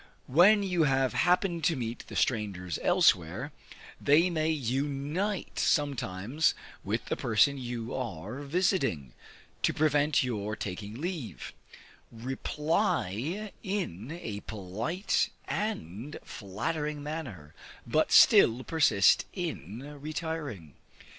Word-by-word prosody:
When 195 +9 +6
you 180 -4 +2
have 135 -2 +2
happened 175 -1 +2
to 165 - +3
meet 120 -2 -5
the - - -9
strangers 100 -7 -1
elsewhere, 130 - +2 0.5
they 160 +5 +4
may 160 -1 0
unite 145 - -2
sometimes 130 - +1 0.3
with - - -2
the - - -1
person 120 +5 +2
you 120 -2 -5
are 115 - -5
visiting, 140 - 0 0.5
to - - +2
prevent 150 -1 +3
your 110 -4 -2
taking 105 +1 -6
leave; 165 -7 -5 0.6
reply 140 - -1
in 165 - -4
a 105 -3 -4
polite 110 - -2 0.2
and 145 - -4
flattering 150 - -4
manner, 130 - -6 0.3
but - - +1
still 120 +3 +7
persist 115 -13 +4
in 140 - -5
retiring. 150 - -5
135 Hz, 100 wpm, -29 LUFS, 105-160 Hz, 0.6 s, still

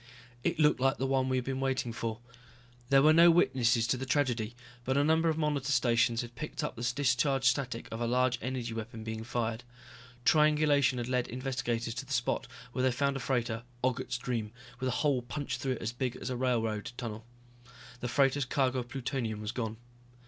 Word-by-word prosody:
It 170 -1 0
looked 150 -3 +4
like 135 +2 +2
the 135 - -1
one 130 -1 +1
we 130 - +1
had 125 - -1
been 130 0 -2
waiting 130 -3 -1
for. 115 0 -4 0.7
There 135 0 +6
were 155 +1 +7
no 170 +2 +8
witnesses 125 -8 +3
to 125 +2 +1
the 130 - -4
tragedy, 125 -5 0 0.3
but 130 +2 0
a 140 - +4
number 160 +2 +3
of 160 - 0
monitor 145 -3 0
stations 120 -2 +2
had 120 0 -9
picked 155 +5 -5
up 150 - -3
the 120 +1 -1
discharge 135 0 +2
static 125 -2 +1
of 115 +1 -5
a 120 - 0
large 125 0 +2
energy 125 -1 -3
weapon 115 0 -6
being 110 0 -5
fired. 115 0 -2 0.6
Triangulation 150 -4 +4
had 120 -1 -3
lead 125 -1 0
investigators 125 -2 -2
to 120 +3 -5
the 140 - -4
spot 120 0 0 0.2
where 125 - -2
they 130 0 +3
found 140 +3 0
a - - -2
freighter, 120 -3 -1 0.2
Ogget's 125 0 0
Dream, 120 -4 -3 0.3
with 130 -1 -1
a 125 - -1
hole 140 -4 +3
punched 140 +4 -4
through 135 -1 0
it 125 - -7
as 115 - -1
big 125 0 -2
as - - -5
a - - -1
railroad 120 -1 -1
tunnel. 110 -3 -5 0.8
The 125 - -3
freighter's 135 +2 +2
cargo 130 0 +1
of 120 -1 -6
plutonium 125 -5 -3
was 105 0 -3
gone. 115 -3 -4
125 Hz, 205 wpm, -31 LUFS, 120-135 Hz, 0.8 s, no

